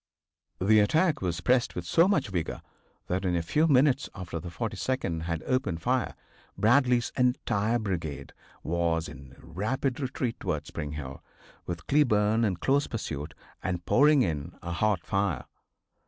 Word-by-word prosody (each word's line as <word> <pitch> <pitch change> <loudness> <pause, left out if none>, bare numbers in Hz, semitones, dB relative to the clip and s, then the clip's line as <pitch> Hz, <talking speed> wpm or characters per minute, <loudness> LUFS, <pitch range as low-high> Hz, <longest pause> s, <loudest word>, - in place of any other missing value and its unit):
The 105 +3 +5
attack 155 - +2
was 85 -2 -2
pressed 125 +4 +2
with 90 - -4
so 165 - +4
much 155 - +1
vigor 90 -4 -3 0.4
that 90 +2 -2
in 90 -2 +1
a 85 - 0
few 155 - +2
minutes 135 -2 +3
after 90 -3 -5
the 85 - -7
42d 85 -2 -2
had 85 -2 -3
opened 105 -11 -1
fire 125 0 0 0.4
Bradley's 120 +3 +3
entire 120 -3 +1
brigade 85 -10 -4 0.3
was 85 0 0
in 70 -3 -12
rapid 110 - -2
retreat 130 -3 -3
towards 75 -6 -3
Spring 75 -2 -5
Hill, 70 -3 -7 0.5
with 85 -1 -5
Cleburne 110 -6 +3
in 100 -4 +1
close 140 +11 +1
pursuit, 75 -9 -5 0.3
and 90 -2 -3
pouring 145 +3 +5
in 80 -2 -3
a 85 - -4
hot 100 0 0
fire. 100 -8 -1
100 Hz, 150 wpm, -28 LUFS, 85-125 Hz, 0.5 s, The